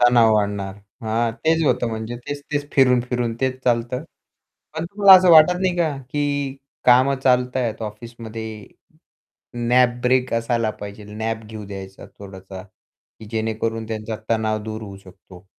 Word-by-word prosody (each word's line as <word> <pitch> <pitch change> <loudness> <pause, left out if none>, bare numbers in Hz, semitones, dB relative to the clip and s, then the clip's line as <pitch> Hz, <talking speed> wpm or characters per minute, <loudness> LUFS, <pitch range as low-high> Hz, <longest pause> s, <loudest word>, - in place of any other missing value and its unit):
तणाव 120 -2 +5
वाढणार. 100 -2 -1 0.3
हां, 115 +1 0
तेच 160 +1 +3
होतं 120 - +1
म्हणजे 110 +1 -5
तेच-तेच 145 0 -4
फिरून-फिरून 125 -3 +2
तेच 130 -1 -1
चालतं 120 +3 0 0.7
पण 160 +1 -3
तुम्हाला 200 +2 +5
असं 180 -1 +4
वाटत 160 +2 +8
नाही 185 -2 0
का, 160 -5 0
की 140 +1 -2 0.3
कामं 130 +2 +5
चालत 125 -1 +2
आहेत 115 -3 -2
ऑफिसमध्ये 110 -1 -8 1.0
नॅप 125 0 +3
ब्रेक 125 0 +1
असायला 115 -1 0
पाहिजे 105 +1 -8
नॅप 110 +2 -4
घेऊ 110 0 -8
द्यायचा 95 -1 -9
थोडासा, 95 -1 -10
की 100 +2 -20
जेणेकरून 110 0 -2
त्यांचा 110 0 -4
तणाव 110 -1 0
दूर 110 0 -6
होऊ 100 -2 -9
शकतो. 95 -1 -16
115 Hz, 140 wpm, -21 LUFS, 110-130 Hz, 1.0 s, वाटत